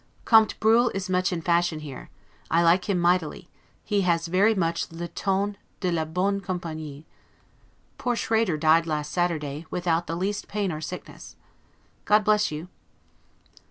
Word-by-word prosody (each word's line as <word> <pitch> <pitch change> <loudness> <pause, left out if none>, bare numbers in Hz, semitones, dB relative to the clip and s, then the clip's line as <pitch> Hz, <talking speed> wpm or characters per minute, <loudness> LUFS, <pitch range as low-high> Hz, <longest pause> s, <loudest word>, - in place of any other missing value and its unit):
Comte 220 -1 +5
Bruhl 230 +3 +4
is 190 -1 -3
much 185 +1 +1
in 170 -2 -3
fashion 170 -2 +1
here; 145 -4 -9 0.4
I 165 +1 +3
like 175 +4 +3
him 195 - +2
mightily; 175 0 0 0.3
he 205 -1 0
has 170 -2 +1
very 200 +6 +3
much 170 -4 -1
'le 170 +1 -6
ton 200 +1 -1 0.2
de 180 -2 -1
la 160 -2 0
bonne 190 +5 -1
campagnie'. 160 -5 -6 0.9
Poor 245 -1 0
Schrader 225 -7 +1
died 160 +2 +4
last 150 -2 -2
Saturday, 160 -3 -2
without 170 -1 -1
the 165 - -3
least 195 +4 -2
pain 205 -3 -2
or 155 -1 -5
sickness. 180 +3 -8 0.7
God 210 0 +4
bless 210 0 +3
you! 155 +3 -6
175 Hz, 155 wpm, -25 LUFS, 165-200 Hz, 0.9 s, Comte